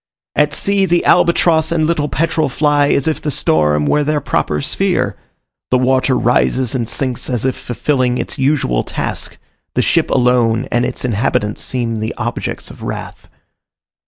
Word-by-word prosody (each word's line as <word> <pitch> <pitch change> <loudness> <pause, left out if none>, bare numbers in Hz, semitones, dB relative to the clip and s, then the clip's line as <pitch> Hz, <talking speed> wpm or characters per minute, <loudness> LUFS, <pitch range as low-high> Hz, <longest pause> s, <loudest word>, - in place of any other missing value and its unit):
At 150 0 +2
sea 200 -1 +2
the 175 -1 +1
albatross 170 -2 +3
and 160 -2 +1
little 155 -2 0
petrel 155 0 0
fly 145 +1 +2
as 140 - +1
if 160 - -1
the 150 - -2
storm 75 - +1
were 150 - +2
their 150 +1 0
proper 75 - -1
sphere, - - 0 0.5
the 125 - +3
water 130 0 +2
rises 125 0 +1
and 120 -4 -2
sinks 130 -2 -2
as 125 -2 -1
if 130 - 0
fulfilling 125 0 -1
its - - -4
usual 130 - +1
task, - - -4 0.4
the - - +2
ship - - +1
alone 125 -1 +2
and 120 0 +1
its 125 - -3
inhabitants 105 -2 -1
seem 120 -3 -2
the 110 +1 -3
objects 120 +1 -4
of - - -14
wrath. - - -7
130 Hz, 160 wpm, -16 LUFS, 120-150 Hz, 0.5 s, albatross